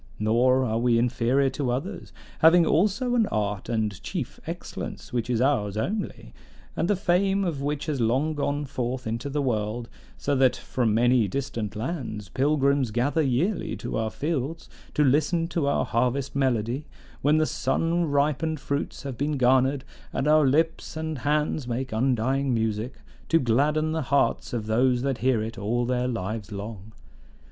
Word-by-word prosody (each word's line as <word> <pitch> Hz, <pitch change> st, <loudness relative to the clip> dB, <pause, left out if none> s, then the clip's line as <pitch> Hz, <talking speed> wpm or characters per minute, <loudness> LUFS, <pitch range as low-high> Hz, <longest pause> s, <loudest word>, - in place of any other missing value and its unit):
Nor 125 Hz, +4 st, +3 dB
are 110 Hz, -1 st, 0 dB
we 120 Hz, -1 st, +3 dB
inferior 125 Hz, +3 st, +2 dB
to 135 Hz, -2 st, -2 dB
others, 160 Hz, +11 st, -4 dB, 0.3 s
having 165 Hz, +1 st, +6 dB
also 215 Hz, -, +2 dB
an 230 Hz, -4 st, +3 dB
art 105 Hz, -2 st, -2 dB
and 110 Hz, -4 st, -1 dB
chief -, -, -5 dB
excellence -, -, -6 dB
which 120 Hz, -1 st, -1 dB
is 120 Hz, -2 st, +1 dB
ours 105 Hz, -7 st, +1 dB
only, 200 Hz, -, -3 dB, 0.4 s
and 170 Hz, -, 0 dB
the 205 Hz, -, +3 dB
fame 195 Hz, +2 st, +2 dB
of 165 Hz, -7 st, -2 dB
which 145 Hz, +1 st, -2 dB
has 150 Hz, -5 st, -2 dB
long 130 Hz, +7 st, +1 dB
gone 145 Hz, 0 st, -1 dB
forth 130 Hz, -2 st, -3 dB
into 115 Hz, +5 st, -3 dB
the 145 Hz, +1 st, -1 dB
world; 115 Hz, -1 st, -2 dB, 0.3 s
so 145 Hz, -, 0 dB
that 130 Hz, -1 st, +4 dB
from 115 Hz, -4 st, -1 dB
many 120 Hz, -1 st, +4 dB
distant 110 Hz, -2 st, -3 dB
lands 110 Hz, -, -4 dB
pilgrims 140 Hz, -, +2 dB
gather 125 Hz, +8 st, +1 dB
yearly 150 Hz, -, 0 dB
to -, -, -5 dB
our 110 Hz, 0 st, 0 dB
fields 155 Hz, +3 st, -3 dB, 0.3 s
to 150 Hz, -, +4 dB
listen 155 Hz, +5 st, +2 dB
to 165 Hz, -4 st, 0 dB
our 140 Hz, -, +1 dB
harvest 125 Hz, +3 st, 0 dB
melody, 130 Hz, +1 st, 0 dB, 0.3 s
when 150 Hz, +2 st, +4 dB
the 155 Hz, -, +3 dB
sun 165 Hz, +6 st, 0 dB
ripened 150 Hz, +1 st, 0 dB
fruits 140 Hz, +2 st, -3 dB
have 135 Hz, -3 st, -6 dB
been 145 Hz, +1 st, 0 dB
garnered, 130 Hz, +2 st, +3 dB, 0.3 s
and 140 Hz, -, -1 dB
our 155 Hz, -1 st, +5 dB
lips 160 Hz, +3 st, 0 dB
and 160 Hz, -3 st, -3 dB
hands 150 Hz, -1 st, 0 dB
make 125 Hz, +2 st, -3 dB
undying 130 Hz, +3 st, +1 dB
music, 110 Hz, +2 st, -1 dB, 0.3 s
to 165 Hz, -, +5 dB
gladden 150 Hz, +6 st, +2 dB
the 160 Hz, 0 st, -1 dB
hearts 140 Hz, 0 st, +1 dB
of 115 Hz, -3 st, -3 dB
those 125 Hz, +3 st, +2 dB
that 135 Hz, -2 st, -1 dB
hear 125 Hz, -3 st, +2 dB
it 115 Hz, +1 st, -6 dB
all 120 Hz, +4 st, 0 dB
their 125 Hz, 0 st, 0 dB
lives 110 Hz, -2 st, -4 dB
long. 105 Hz, +1 st, -7 dB
130 Hz, 165 wpm, -26 LUFS, 115-150 Hz, 0.4 s, having